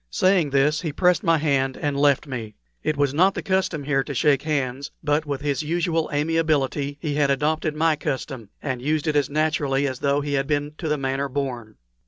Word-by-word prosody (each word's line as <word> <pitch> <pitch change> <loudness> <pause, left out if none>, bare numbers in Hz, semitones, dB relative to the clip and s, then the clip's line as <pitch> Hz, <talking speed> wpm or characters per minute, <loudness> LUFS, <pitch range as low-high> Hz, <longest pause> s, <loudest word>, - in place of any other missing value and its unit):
Saying 185 - +2
this, 140 +3 +2
he 160 - -3
pressed 180 +3 +2
my 165 -1 +3
hand 140 -3 0
and 145 -1 -2
left 140 -1 +3
me. 115 -6 -6 0.3
It 155 - -1
was 140 -1 +1
not 185 +6 +3
the - - -4
custom 185 -5 0
here 135 -1 +1
to 140 - -5
shake 140 +1 +3
hands, 140 -2 -2
but 150 +1 +1
with 140 -1 -3
his 145 -1 -1
usual 165 +1 0
amiability 145 -2 0
he 150 -2 -2
had 145 -1 +2
adopted 150 +2 0
my 160 0 +2
custom, 130 -6 -4
and 130 -3 -3
used 150 +3 0
it 155 -2 0
as 145 -2 +2
naturally 145 -2 +1
as 130 -2 -4
though 140 0 +1
he 145 0 -3
had 135 -1 0
been 145 0 -1
to 165 - -3
the 150 0 +1
manner 135 +1 -2
born. 125 -5 -4
145 Hz, 210 wpm, -23 LUFS, 135-155 Hz, 0.3 s, my